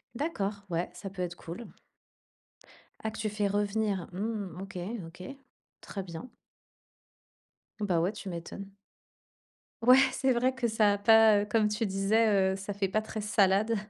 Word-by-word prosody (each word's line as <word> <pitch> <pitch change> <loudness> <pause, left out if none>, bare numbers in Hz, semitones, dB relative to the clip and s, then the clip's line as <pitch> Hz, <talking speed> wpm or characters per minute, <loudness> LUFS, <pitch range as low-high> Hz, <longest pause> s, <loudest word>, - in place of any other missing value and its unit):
D'accord, 205 -9 -2
ouais, 170 0 -1
ça 195 +3 -7
peut 190 -1 -7
être 175 -1 -3
cool. 175 +7 -8 1.4
Ah, 220 - -1
que 220 - -9
tu 215 -1 -1
fais 210 0 0
revenir? 205 -2 -1
Mmh. 200 -3 -4
OK, 195 -1 -8 0.3
OK, 175 +2 -12 0.6
très 195 - -6
bien. 180 +7 -8 1.5
Bah, 190 -5 +1
ouais, 180 +4 +1
tu 210 - -9
m'étonnes. 195 +3 -8 1.1
Ouais, 250 +3 +7 0.2
c'est 265 0 +1
vrai 250 +2 +2
que 255 -2 0
ça 215 -2 +3
a - - -1
pas, 220 0 +6
heu, - - -2
comme 210 0 +2
tu 210 +2 -1
disais, 195 0 +2
heu, - - -3
ça 195 +1 -5
fait 195 0 -1
pas 215 +3 0
très 220 0 -6
salade. 210 +1 +3
205 Hz, 160 wpm, -30 LUFS, 190-220 Hz, 1.5 s, Ouais